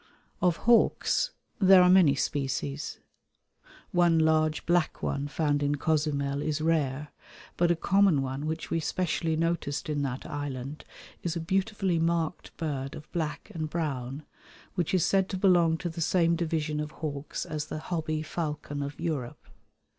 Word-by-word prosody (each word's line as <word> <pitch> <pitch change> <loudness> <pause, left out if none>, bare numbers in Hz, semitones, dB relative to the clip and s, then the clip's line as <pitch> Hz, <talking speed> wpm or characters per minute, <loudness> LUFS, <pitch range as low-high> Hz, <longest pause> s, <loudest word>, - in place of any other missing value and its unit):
Of 175 -2 +3
hawks 240 - +3 0.3
there 190 -2 +7
are - - +6
many 180 -6 +6
species. 140 0 -2 0.9
One 175 -2 +4
large 155 -1 +2
black 175 -2 +1
one 140 +1 -1
found 145 -1 0
in 145 0 +1
Cozumel 145 -2 0
is 155 0 -1
rare, 150 -3 0 0.5
but 175 0 +2
a 175 - +4
common 190 -4 +3
one 135 +3 -3
which 160 +1 -4
we 165 - +1
specially 165 -1 -1
noticed 160 -3 -1
in 145 -1 0
that 130 -2 -3
island 145 0 -5 0.4
is 170 -1 -2
a - - -1
beautifully 190 +1 0
marked 165 0 -1
bird 140 -3 -3
of 155 -1 -11
black 155 -4 -3
and 155 -2 -3
brown 145 -3 -3 0.5
which 180 0 0
is 180 - +3
said 195 -1 +2
to 190 - -2
belong 175 -4 +4
to 175 - -4
the 165 0 -5
same 170 0 +3
division 155 -2 -1
of 150 0 -3
hawks 145 -2 -5
as 150 -1 -4
the - - -5
hobby 155 -1 -2
falcon 150 -3 -4
of 140 +1 -5
Europe. 150 -8 -3
155 Hz, 155 wpm, -28 LUFS, 145-170 Hz, 0.9 s, there